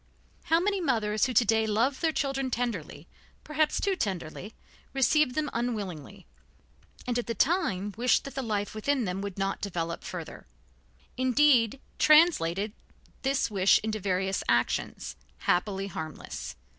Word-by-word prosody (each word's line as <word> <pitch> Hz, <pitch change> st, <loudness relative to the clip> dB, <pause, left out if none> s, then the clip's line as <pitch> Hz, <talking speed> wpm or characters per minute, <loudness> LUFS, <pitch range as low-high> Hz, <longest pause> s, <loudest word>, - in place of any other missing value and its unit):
How 325 Hz, -, +3 dB
many 395 Hz, +1 st, 0 dB
mothers 220 Hz, -7 st, +1 dB
who 255 Hz, -, -3 dB
to 240 Hz, -, +5 dB
day 220 Hz, +1 st, +2 dB
love 235 Hz, +6 st, +1 dB
their 325 Hz, -, +2 dB
children 270 Hz, -3 st, -1 dB
tenderly, 205 Hz, -, -3 dB, 0.4 s
perhaps 305 Hz, 0 st, +1 dB
too 395 Hz, -1 st, +1 dB
tenderly, 190 Hz, -, -4 dB, 0.4 s
received 270 Hz, 0 st, +3 dB
them 310 Hz, -1 st, 0 dB
unwillingly, 200 Hz, -, -4 dB, 0.8 s
and 245 Hz, -1 st, 0 dB
at 240 Hz, -, -4 dB
the 230 Hz, -, -2 dB
time 210 Hz, -, +1 dB
wished 240 Hz, +1 st, +2 dB
that 275 Hz, -, -8 dB
the 270 Hz, -, -3 dB
life 210 Hz, -4 st, -2 dB
within 250 Hz, +3 st, 0 dB
them 185 Hz, +1 st, -3 dB
would 200 Hz, -2 st, -5 dB
not 195 Hz, 0 st, -2 dB
develop 170 Hz, -4 st, -3 dB
further; -, -, -7 dB, 0.7 s
indeed, 255 Hz, -2 st, +4 dB, 0.2 s
translated 215 Hz, -, +4 dB, 0.5 s
this 270 Hz, -4 st, 0 dB
wish 195 Hz, -1 st, +4 dB
into 215 Hz, 0 st, -2 dB
various 190 Hz, 0 st, 0 dB
actions, 120 Hz, -, 0 dB, 0.3 s
happily 195 Hz, +2 st, 0 dB
harmless. 160 Hz, -5 st, -6 dB
220 Hz, 140 wpm, -28 LUFS, 195-270 Hz, 0.8 s, to